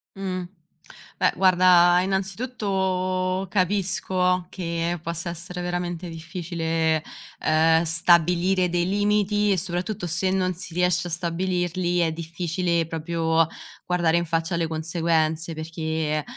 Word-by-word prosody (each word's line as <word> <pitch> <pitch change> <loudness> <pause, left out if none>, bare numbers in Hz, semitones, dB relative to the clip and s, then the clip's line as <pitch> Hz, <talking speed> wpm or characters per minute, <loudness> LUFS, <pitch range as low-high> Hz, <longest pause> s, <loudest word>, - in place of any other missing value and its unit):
Mh, 185 -2 -3 0.7
beh, - - +3
guarda, 180 -1 +5
innanzitutto, 190 -2 -1
capisco 185 -1 +1
che 170 -1 -3
possa 170 0 -4
essere 175 +1 -7
veramente 175 0 -3
difficile, 165 -1 -2 0.4
ehm, 160 +1 +3
stabilire 175 +2 +3
dei 175 0 0
limiti 205 +1 +2
e 195 - +2
soprattutto 180 +2 -3
se 180 +3 -1
non 185 -1 +1
si 175 -1 -9
riesce 180 0 +1
a - - -7
stabilirli, 175 +1 -1
è 165 -2 +2
difficile 170 +1 -1
proprio 165 0 0 0.4
guardare 170 -2 +2
in 170 - 0
faccia 165 +1 -1
le 170 -1 0
conseguenze 160 0 0
perché, 160 -1 -2
175 Hz, 115 wpm, -24 LUFS, 165-185 Hz, 0.7 s, guarda